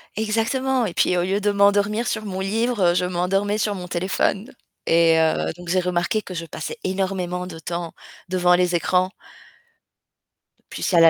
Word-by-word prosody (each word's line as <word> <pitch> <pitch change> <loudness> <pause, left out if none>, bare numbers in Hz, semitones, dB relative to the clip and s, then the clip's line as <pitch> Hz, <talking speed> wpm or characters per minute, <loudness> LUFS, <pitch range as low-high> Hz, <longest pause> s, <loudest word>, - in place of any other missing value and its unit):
Exactement 230 +4 0
et 180 - -4
puis 180 - +2
au - - +2
lieu 195 +2 0
de 205 0 +1
m'endormir 205 +3 +2
sur 215 - -2
mon 190 -2 -4
livre, 205 -2 +1
je 180 - +1
m'endormais 195 +4 0
sur 210 -1 0
mon 180 -1 -7
téléphone 190 +5 -1 0.4
et 165 -1 +5
heu, 160 0 +1
donc 175 0 -10
j'ai 185 +1 +3
remarqué 180 +4 0
que 185 - -8
je 170 -1 -4
passais 465 - -6
énormément 185 -2 -2
de 165 -3 -8
temps 170 +1 -5 0.3
devant 180 -1 +3
les 180 0 +1
écrans. 185 +2 +1 1.6
Plus - - -3
la 165 -1 +8
185 Hz, 170 wpm, -22 LUFS, 175-205 Hz, 1.6 s, la